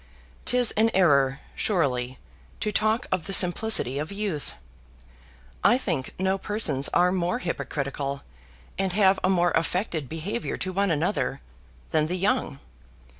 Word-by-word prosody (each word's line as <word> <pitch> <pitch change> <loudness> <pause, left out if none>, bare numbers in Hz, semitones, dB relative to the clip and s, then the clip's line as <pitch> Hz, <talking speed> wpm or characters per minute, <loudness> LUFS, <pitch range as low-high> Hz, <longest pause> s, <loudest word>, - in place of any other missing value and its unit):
'Tis 245 -1 +3
an 220 +2 +3
error, 140 -7 +3
surely, 130 - -1 0.4
to 210 - -1
talk 220 +3 +1
of 175 - -1
the - - -4
simplicity 180 - +2
of 155 +4 -4
youth. 200 -7 -3 1.1
I - - +5
think 170 - -3
no 190 +1 0
persons 165 -11 +2
are 180 +1 +3
more 180 -1 0
hypocritical, 140 -4 -4 0.6
and 190 -2 +1
have 195 -1 +4
a 185 - +3
more 175 -2 +3
affected 165 - -1
behavior 190 +9 -4
to 185 - -3
one 200 +1 +1
another, 160 -3 -1 0.5
than 155 0 +2
the 180 +3 -2
young. 195 - 0
180 Hz, 135 wpm, -25 LUFS, 150-200 Hz, 1.1 s, I